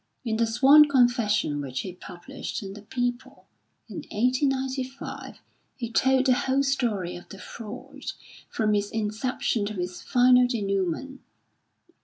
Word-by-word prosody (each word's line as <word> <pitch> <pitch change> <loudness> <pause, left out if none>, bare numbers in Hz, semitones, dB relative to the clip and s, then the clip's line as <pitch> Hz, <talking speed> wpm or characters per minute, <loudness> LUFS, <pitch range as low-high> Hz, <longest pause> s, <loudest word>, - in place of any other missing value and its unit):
In 220 -2 -1
the 230 0 +2
sworn 280 +6 +6
confession 235 - +2
which 130 -2 -4
he 185 - -7
published 195 +8 -7
in 195 0 -7
the 210 - -10
People, 245 +3 -4 0.4
in - - -9
1895, 260 +2 -2 0.4
he 235 -3 -5
told 265 +2 +3
the 260 - +5
whole 265 +2 +1
story 230 -10 -1
of 175 - -11
the 195 - -10
fraud 250 +8 -10 0.4
from 215 -2 0
its 205 0 0
inception 220 0 -1
to 210 -2 -5
its 180 0 -4
final 250 0 +5
denouement. 205 +3 -2
235 Hz, 135 wpm, -26 LUFS, 205-265 Hz, 0.4 s, sworn